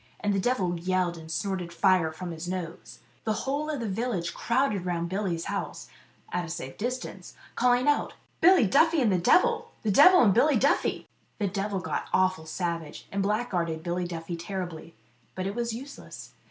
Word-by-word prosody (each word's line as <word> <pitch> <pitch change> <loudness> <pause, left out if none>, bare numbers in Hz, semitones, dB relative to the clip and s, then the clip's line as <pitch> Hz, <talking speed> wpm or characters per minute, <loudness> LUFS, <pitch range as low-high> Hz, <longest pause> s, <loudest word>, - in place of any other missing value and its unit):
And 205 -1 0
the 195 - +1
devil 185 -6 0
yelled, 180 0 0
and 160 -1 -9
snorted 185 -1 -2
fire 175 -2 +3
from 175 +2 -6
his 165 +1 -6
nose. 165 - -6 0.2
The 220 - 0
whole 290 +3 -1
of 300 -3 -2
the 230 - -3
village 195 -4 -2
crowded 235 -6 0
round 170 -1 -2
Billy's 185 -3 -2
house - - -4 0.4
at 180 - 0
a 170 - -7
safe 160 -6 -6
distance 250 +3 -5 0.2
calling 250 +2 +3
out, 290 - +1 0.3
"Billy 360 -3 +7 0.4
and 235 -6 +3
the 185 - +2
devil! 455 - +3
The 215 - +1
devil 360 - +8
and 200 -4 +5
Billy 280 +6 +4
Duffy 275 +6 +1 0.2
!" - - -40
The 210 - -1
devil 195 0 -2
got - - -3
awful 185 -4 +2
savage, 170 -2 -4
and 195 0 0
blackguarded 180 -7 -1
Billy 175 +1 -2
Duffy 170 0 -5
terribly; 170 -2 -6 0.4
but 185 - -3
it 195 - -2
was 235 +1 -2
useless. 270 +5 -9
190 Hz, 180 wpm, -27 LUFS, 170-240 Hz, 0.4 s, devil